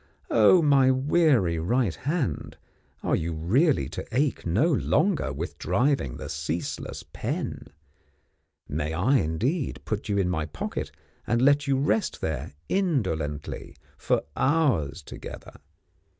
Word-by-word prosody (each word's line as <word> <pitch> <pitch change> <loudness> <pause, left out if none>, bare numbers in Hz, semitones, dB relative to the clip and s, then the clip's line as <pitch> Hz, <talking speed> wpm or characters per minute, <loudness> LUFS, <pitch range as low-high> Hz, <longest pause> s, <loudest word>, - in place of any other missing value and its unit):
Oh, 120 - +6
my 140 -3 +5
weary 130 - +3
right 115 +3 +1
hand, 140 - -2 0.5
are - - +2
you 80 +1 -2
really 125 - +2
to - - -5
ache 135 -4 0
no 110 - +3
longer 165 +4 +1
with - - -5
driving 130 - +1
the - - -6
ceaseless 85 +2 -4
pen? - - -4 1.0
May 75 +2 -2
I, 110 +12 +3
indeed, 120 - -1
put 110 0 -3
you 100 - +1
in 95 -2 +2
my 80 -4 -1
pocket 75 - -4 0.4
and 115 +1 +2
let 140 +2 +4
you 135 -1 +2
rest 150 +10 0
there, 75 -2 -3
indolently, 95 - -1 0.2
for - - 0
hours 130 - +1
together? - - -10
120 Hz, 125 wpm, -26 LUFS, -, 1.0 s, Oh